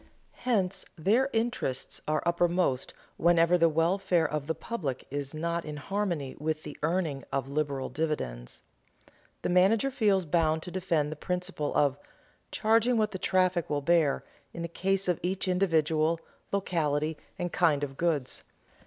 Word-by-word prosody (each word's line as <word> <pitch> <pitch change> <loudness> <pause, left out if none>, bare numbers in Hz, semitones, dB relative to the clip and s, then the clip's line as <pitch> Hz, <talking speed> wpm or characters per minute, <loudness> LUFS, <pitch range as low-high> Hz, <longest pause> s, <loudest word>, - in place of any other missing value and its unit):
Hence 195 -5 +1
their 225 - +3
interests 225 - -2
are 155 0 +1
uppermost 170 -5 +1 0.3
whenever 170 +1 +4
the 170 -1 +5
welfare 170 +1 +2
of 150 -1 -3
the 160 - -1
public 155 - -4
is 145 +1 -4
not 170 +2 -1
in 150 -1 -6
harmony 170 -5 -2
with 155 +1 -2
the 150 - -7
earning 155 -3 0
of 135 -1 -1
liberal 140 -2 -1
dividends. 130 - -3 0.8
The - - 0
manager 200 +9 +4
feels 205 -7 +2
bound 160 0 +1
to 180 - -7
defend 170 -5 0
the - - -4
principle 180 -1 -2
of 140 -1 +2 0.5
"charging 230 +2 +3
what 215 -1 +1
the 190 - -5
traffic 185 -2 +1
will 145 -1 0
bear" 160 -3 +3 0.3
in 170 - -4
the - - -2
case 195 +3 0
of 180 -3 +1
each 190 +2 -2
individual, 165 -3 +2 0.3
locality, 155 -5 0 0.2
and 175 -1 -3
kind 150 -5 +3
of 135 -1 -4
goods. 150 -5 -1
170 Hz, 150 wpm, -29 LUFS, 150-185 Hz, 0.8 s, the